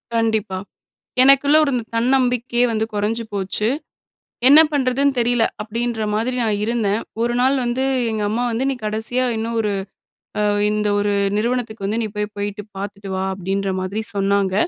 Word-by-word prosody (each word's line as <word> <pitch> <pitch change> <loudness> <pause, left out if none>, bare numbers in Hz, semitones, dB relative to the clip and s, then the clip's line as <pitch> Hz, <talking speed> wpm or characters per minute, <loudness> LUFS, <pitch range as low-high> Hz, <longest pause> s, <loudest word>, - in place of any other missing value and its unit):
கண்டிப்பா. 220 -4 0 0.7
எனக்குள்ள 275 +2 +6
இருந்த 250 -4 -1
தன்னம்பிக்கையே 245 0 +2
வந்து 220 0 0
கொறஞ்சு 215 +3 -1
போச்சு. 200 +2 -1 0.8
என்ன 290 +3 +9
பண்ணுறதுன்னு 275 0 +2
தெரியல, 240 -1 +2 0.2
அப்டின்ற 230 +1 -2
மாதிரி 230 +4 0
நான் 215 -2 +1
இருந்தேன். 220 -2 0 0.2
1 240 0 0
நாள் 260 +2 +3
வந்து 245 +2 -1 0.3
எங்க 215 -1 -2
அம்மா 230 +3 -1
வந்து 235 +3 -1
நீ - - -1
கடைசியா 220 +4 -1
இன்னும் 230 +1 -3
ஒரு 210 -2 0 0.7
அ 210 - +2 0.3
இந்த 210 0 0
1 205 0 +1 0.3
நிறுவனத்துக்கு 230 -2 -2
வந்து 215 +3 -1
நீ - - -1
போய் 210 0 -3
போயிட்டு 205 +1 -3 0.2
பார்த்துட்டு 200 0 -6
வா 190 - -1
அப்டின்ற 195 +1 -2
மாதிரி 195 +4 -3
சொன்னாங்க. 195 -1 +1
220 Hz, 150 wpm, -20 LUFS, 205-245 Hz, 0.8 s, என்ன